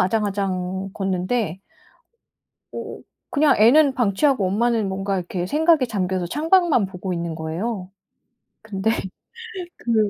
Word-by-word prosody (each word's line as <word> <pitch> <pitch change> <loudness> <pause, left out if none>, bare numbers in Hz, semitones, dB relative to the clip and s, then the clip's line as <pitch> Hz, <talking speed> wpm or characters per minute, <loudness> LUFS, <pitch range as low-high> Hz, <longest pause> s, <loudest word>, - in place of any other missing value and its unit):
아장아장 190 -2 -1
걷는데 190 0 -1 1.1
어 - - -7 0.3
그냥 290 0 +4
애는 265 +6 +6
방치하고 240 0 +2
엄마는 220 +1 +1
뭔가 195 +1 -2
이렇게 175 0 -3
생각에 310 - +3
잠겨서 185 -4 -1
창밖만 315 - +3
보고 185 0 -5
있는 170 -1 -3
거예요. 180 +5 -4 0.7
근데 220 0 -1 0.9
그 220 -3 +1
200 Hz, 255 characters per minute, -22 LUFS, 185-240 Hz, 1.1 s, 애는